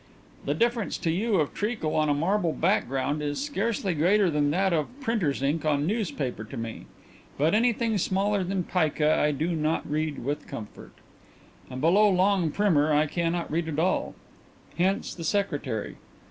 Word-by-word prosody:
"The 145 - 0
difference 235 +2 0
to 165 - -1
you 205 +6 0
of 155 -5 +1
treacle 210 -7 -2
on 155 -1 +2
a - - +4
marble 170 +2 +1
background 145 - 0
is 145 -1 -2
scarcely 230 -8 -1
greater 180 +4 +3
than 145 -1 +1
that 190 +4 +1
of 155 -3 +1
printers' 215 - -1
ink 150 +4 0
on 145 -2 +1
newspaper 160 - -2
to 115 +4 -9
me. 115 -1 -6 0.5
But 155 +5 +2
anything 230 -1 +2
smaller 195 +2 +1
than 185 0 -1
pica 155 -3 +1
I 150 - +2
do 155 +4 -1
not 155 +1 -1
read 155 -4 -2
with 145 +2 -3
comfort, 105 -2 -9 0.8
and 130 0 -6
below 200 +7 +5
long 190 -2 +2
primer 155 -4 +2
I 150 +1 +4
cannot 170 +2 -2
read 160 +1 -1
at 155 -2 -4
all. 180 +4 0 0.6
Hence 190 +3 0
the 170 - -8
secretary. 145 - -2
165 Hz, 165 wpm, -26 LUFS, 150-200 Hz, 0.8 s, below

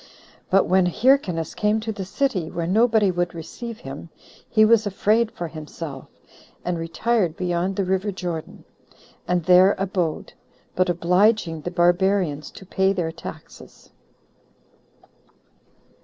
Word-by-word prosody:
But 195 - +4
when 185 0 +3
Hyrcanus 180 - +1
came 210 +1 +1
to 220 0 -3
the 200 -3 -6
city, 195 - -1
where 170 -1 -3
nobody 215 +1 +3
would 175 -1 -2
receive 225 +8 -8
him, 135 +5 -8 0.4
he 215 -1 +5
was 220 -1 +4
afraid 215 +3 +1
for 175 - -5
himself, 155 -3 -8 0.6
and 175 -1 -1
retired 175 +1 0
beyond 180 +1 -1
the 195 - 0
river 190 +2 0
Jordan, 175 -4 -6 0.6
and 180 -1 +1
there 185 +2 +6
abode, 185 -4 -2 0.4
but 185 0 +2
obliging 175 0 +2
the 175 - -4
barbarians 175 -3 +1
to 190 - -13
pay 190 +1 +1
their 170 -4 -2
taxes. 160 - -12
185 Hz, 125 wpm, -23 LUFS, 170-205 Hz, 0.6 s, there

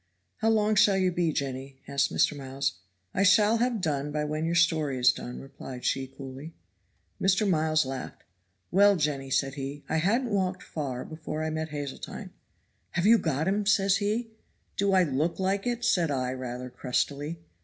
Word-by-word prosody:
"How 225 - +1
long 215 -1 +3
shall 200 -1 +5
you 185 -1 +2
be, 175 -2 +1
Jenny?" 135 -1 -4
asked 140 0 +1
Mr. 150 - +2
Miles. 135 -6 -3 0.3
"I - - 0
shall 210 +3 +5
have 235 -2 0
done 145 -3 -1
by 150 0 -1
when 155 +1 -2
your 170 +1 0
story 160 -5 +2
is 125 0 +6
done," 125 - -7
replied 135 -2 -9
she 135 0 0
coolly. 135 +4 -9 0.7
Mr. 195 +2 +3
Miles 155 -4 +2
laughed. 130 -1 -6 0.5
"Well, 200 +2 +6
Jenny," 145 -5 -1
said 135 0 +1
he, 140 +1 -6
"I 160 - 0
hadn't 225 +9 +1
walked 190 -2 0
far 135 -5 -4
before 155 -1 -5
I 160 - -2
met 160 0 -3
Hazeltine. 145 -2 -6 0.6
'Have 175 +1 0
you 225 +2 +7
got 155 +1 -1
him?' 200 +1 0
says 195 -2 +4
he. 220 +3 -1 0.4
'Do 200 0 +1
I 185 -1 +5
look 155 +2 0
like 195 +3 0
it?' 240 0 -1
said 175 -8 +2
I 130 -3 -1
rather 125 -1 -6
crustily. 140 +5 -2
155 Hz, 175 wpm, -28 LUFS, 135-195 Hz, 0.7 s, you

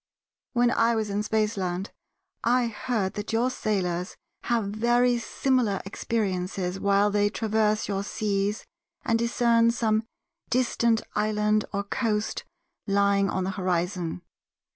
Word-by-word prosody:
When 240 -1 +3
I 230 -1 +3
was 215 -2 -1
in 205 +1 0
Spaceland 210 -4 -1 0.5
I 245 +1 +3
heard 225 -3 -2
that 205 0 -5
your 235 +3 +1
sailors 185 -6 -2 0.3
have 235 -2 +1
very 240 +3 +2
similar 235 -4 0
experiences 190 -3 -2
while 200 +1 +3
they 205 0 +2
traverse 215 0 0
your 195 -1 -1
seas 205 0 -1 0.4
and 230 -1 +2
discern 235 0 +3
some 220 -2 +1 0.5
distant 235 -2 +2
island 210 0 +1
or 200 0 -1
coast 210 0 -1 0.4
lying 200 0 +3
on 190 - -1
the 190 - -1
horizon. 180 - -2
210 Hz, 120 wpm, -26 LUFS, 195-230 Hz, 0.5 s, When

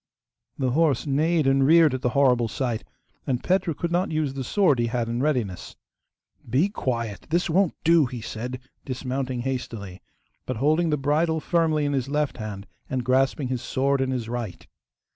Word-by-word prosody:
The 130 -2 0
horse 150 -2 +2
neighed 155 +3 +2
and 135 0 +3
reared 160 0 +6
at 130 - -3
the 125 - +1
horrible 125 -4 +4
sight, 120 -1 -2 0.4
and 125 -3 -1
Petru 180 -4 +1
could 170 +3 -3
not 180 +2 +1
use 155 -3 -1
the 135 -1 -4
sword 150 - +2
he 120 - +1
had 120 0 -1
in 120 +1 -2
readiness. 125 -11 -1 0.7
'Be 140 - +2
quiet! 115 - -3
this 170 +1 +1
won't 185 0 +2
do!' 165 -4 +5
he 120 -1 -6
said, 120 +3 -5 0.2
dismounting 130 -1 -3
hastily, 115 -7 -5 0.5
but 130 - -2
holding 155 +6 +2
the 150 - +1
bridle 155 +4 +1
firmly 160 -2 +1
in 145 - 0
his 135 -1 -1
left 150 0 -1
hand 105 -3 -6 0.2
and 130 -2 -2
grasping 130 +1 +1
his 130 -2 -2
sword 135 +2 0
in 130 - 0
his 125 -4 -2
right. 115 -5 -5
135 Hz, 180 wpm, -25 LUFS, 125-155 Hz, 0.7 s, reared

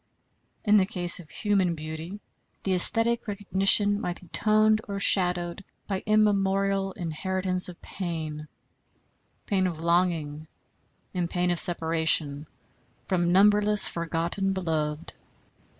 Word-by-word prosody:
In 210 0 +5
the 190 - +3
case 175 -4 +2
of 165 -4 -13
human 195 -5 0
beauty, 160 +5 -7 0.4
the 195 - -1
æsthetic 225 +6 +3
recognition 205 0 +2
might 175 0 -4
be 180 - -17
toned 215 0 +3
or 200 -1 -4
shadowed 180 -1 +2 0.2
by 195 -2 -3
immemorial 195 -2 +1
inheritance 185 +2 -1
of 175 - -11
pain 160 -4 -6 1.0
pain 190 -2 0
of 165 -3 -5
longing, 165 -3 -1 0.7
and 175 -2 -2
pain 180 0 0
of 175 - +1
separation 160 -3 0 0.6
from 175 -2 0
numberless 205 +2 +4
forgotten 170 +4 -2
beloved. 160 -4 -3
180 Hz, 115 wpm, -26 LUFS, 165-200 Hz, 1.0 s, In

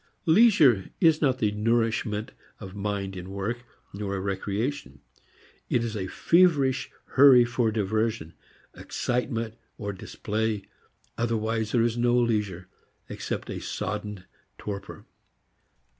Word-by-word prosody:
Leisure 160 - +5
is 160 -3 +4
not 130 -4 +2
the 105 -4 +1
nourishment 110 0 0 0.3
of 95 -3 -9
mind 100 -1 -3
in 90 0 -7
work, 100 +5 -3 0.3
nor 100 0 -3
a - - -2
recreation; 100 - -3 0.7
it 120 - +1
is 115 -2 -3
a 95 -3 -3
feverish 150 - +3 0.2
hurry 130 -3 +7
for 120 -2 0
diversion, 110 -5 -1 0.4
excitement, 115 -2 -2 0.5
display, 110 -1 -2 0.6
otherwise 110 -1 -1
there 120 -2 +3
is 120 0 0
no 120 0 +3
leisure 105 -7 0 0.4
except - - -4
a - - -4
sodden 105 -3 -4 0.3
torpor. 100 -1 -7
110 Hz, 115 wpm, -26 LUFS, 100-120 Hz, 0.7 s, hurry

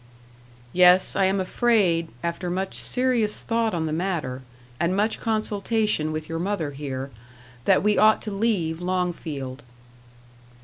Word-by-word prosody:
"Yes, 180 +1 +5
I 195 - +3
am 190 +1 +1
afraid, 185 -4 +2 0.2
after 170 +1 -3
much 190 +2 -2
serious 250 -4 0
thought 230 -3 0
on 160 -1 -1
the 155 - -2
matter, 160 -7 -2 0.4
and 170 +3 +1
much 215 +2 +1
consultation 215 -5 0
with 155 0 -4
your 165 0 -4
mother 175 -5 -2
here, 135 -1 -5 0.5
that - - +4
we 210 0 +3
ought 215 0 +5
to 215 - -4
leave 195 -6 0
Longfield." 165 -7 -3
185 Hz, 135 wpm, -24 LUFS, 160-210 Hz, 0.5 s, Yes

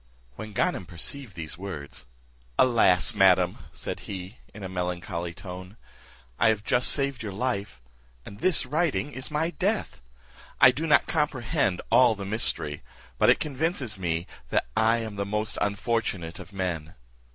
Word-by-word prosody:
When 110 -1 -8
Ganem 95 -2 0
perceived 100 - -5
these 80 -1 -5
words, 75 -9 -7 0.5
"Alas! 115 -8 +4
madam," 90 -2 +4
said - - -5
he, 95 +3 -7
in 105 - -10
a - - -3
melancholy 90 -1 -3
tone, 90 +3 -9 0.6
"I - - +5
have 105 -2 0
just 125 +3 +3
saved 140 -3 +1
your 105 -3 -4
life, 100 - -2 0.5
and 100 0 -10
this 180 -2 +3
writing 150 +1 0
is 130 -1 -5
my 155 +3 0
death! 200 - -1 0.6
I 130 - +9
do 150 +6 -3
not 150 - +5
comprehend 130 - 0
all 125 -3 +6
the 100 -1 -6
mystery; 80 -8 0 0.4
but - - +5
it - - +5
convinces 140 - -1
me 85 -1 -1 0.5
I 110 +1 +4
am 110 -3 -5
the 100 - 0
most 105 +2 -2
unfortunate 100 -5 -1
of - - -10
men. 90 -4 -3
105 Hz, 150 wpm, -27 LUFS, 90-125 Hz, 0.6 s, I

